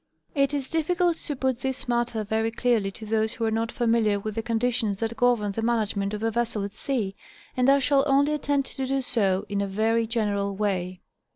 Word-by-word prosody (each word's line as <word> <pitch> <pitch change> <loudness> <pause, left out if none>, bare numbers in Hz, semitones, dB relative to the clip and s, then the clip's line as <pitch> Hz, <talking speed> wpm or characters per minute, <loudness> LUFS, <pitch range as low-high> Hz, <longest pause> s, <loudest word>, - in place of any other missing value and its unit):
It 275 -2 +2
is 280 -3 -2
difficult 335 +2 +1
to 295 - -5
put 260 -2 0
this 265 0 -3
matter 240 -2 0
very 220 +2 0
clearly 230 -3 +1
to 215 +3 -10
those 220 +1 0
who 230 - -2
are 220 - +1
not 225 +1 -1
familiar 225 -4 +2
with 215 +1 -4
the 225 - -2
conditions 230 -2 0
that 225 +2 -2
govern 240 -5 +2
the 225 - -3
management 215 -3 0
of 210 - -6
a 225 - +1
vessel 230 -2 -1
at 200 0 -5
sea, 220 -8 -2 0.4
and 255 +1 +3
I 275 - +6
shall 275 0 +3
only 285 +2 +3
attempt 285 -2 -1
to 265 -1 -2
do 270 +1 0
so 200 -6 +1
in 200 -1 -1
a 200 - -1
very 225 +3 +1
general 205 -3 -1
way. 185 -3 -2
230 Hz, 210 wpm, -26 LUFS, 210-260 Hz, 0.4 s, I